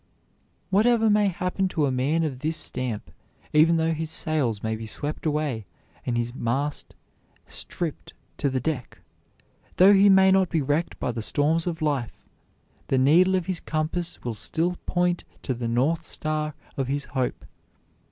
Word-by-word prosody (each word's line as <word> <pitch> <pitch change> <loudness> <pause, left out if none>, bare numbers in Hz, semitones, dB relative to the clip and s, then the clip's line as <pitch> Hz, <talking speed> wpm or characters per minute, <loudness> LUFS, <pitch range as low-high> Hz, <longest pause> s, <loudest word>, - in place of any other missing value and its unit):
Whatever 220 +2 +4
may 210 0 +4
happen 185 +1 -1
to 160 -5 0
a 135 - +1
man 140 +6 +1
of 140 -5 -3
this 155 +3 -1
stamp, 125 -4 -3 0.4
even 160 +2 +5
though 165 0 +1
his 160 0 -4
sails 140 -10 -1
may 110 0 -1
be 110 0 -7
swept 145 +8 -3
away 145 - -1 0.4
and 120 -1 0
his 120 0 -2
mast 135 +4 -2 0.5
stripped 165 -4 -5 0.3
to 140 - +1
the 130 -1 -1
deck, 130 -2 -3 0.8
though 190 +3 +8
he 200 +1 +6
may 190 0 +6
be 170 -2 -1
wrecked 145 +4 -1
by 125 - -1
the 115 -1 -4
storms 155 +8 +1
of 165 -2 -3
life, 140 -6 -2 0.6
the 135 - +1
needle 170 +8 +5
of 185 -2 0
his 185 -2 -2
compass 160 +2 -3
will 120 - -2
still 165 - -1
point 175 0 +1 0.2
to 130 - -1
the 120 -1 -4
North 140 +8 +1
Star 155 -1 -2 0.2
of 135 -2 -1
his 140 +1 -2
hope. 130 -2 -2
155 Hz, 160 wpm, -25 LUFS, 130-170 Hz, 0.8 s, though